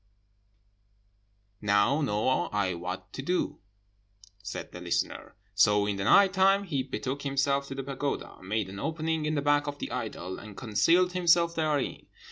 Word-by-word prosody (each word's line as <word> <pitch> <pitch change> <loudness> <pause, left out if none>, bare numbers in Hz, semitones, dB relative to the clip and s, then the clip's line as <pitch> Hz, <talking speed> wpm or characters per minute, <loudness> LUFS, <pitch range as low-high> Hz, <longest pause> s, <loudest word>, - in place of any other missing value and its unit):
"'Now 105 +8 +3
know 105 -7 0 0.2
I 100 -3 0
what 90 +2 -6
to - - -5
do,' 180 +6 -1 0.8
said 100 0 -6
the 90 - -9
listener; 85 -1 -2 0.2
so 105 0 +4
in 100 -1 -1
the 95 - -2
night 195 -1 +6
time 195 +1 +4
he 150 -9 -1
betook 135 +1 -4
himself 140 0 0
to 135 - -6
the 135 - -4
pagoda, 140 +1 -4
made 105 +2 -2
an 100 +1 -8
opening 160 0 -1
in 155 - 0
the 145 - -1
back 145 0 +2
of 145 0 -4
the - - -5
idol, 90 +2 -5
and 105 -2 -11
concealed 165 - +3
himself 170 -1 +3
therein. 155 -4 -1
140 Hz, 160 wpm, -28 LUFS, 100-160 Hz, 0.8 s, night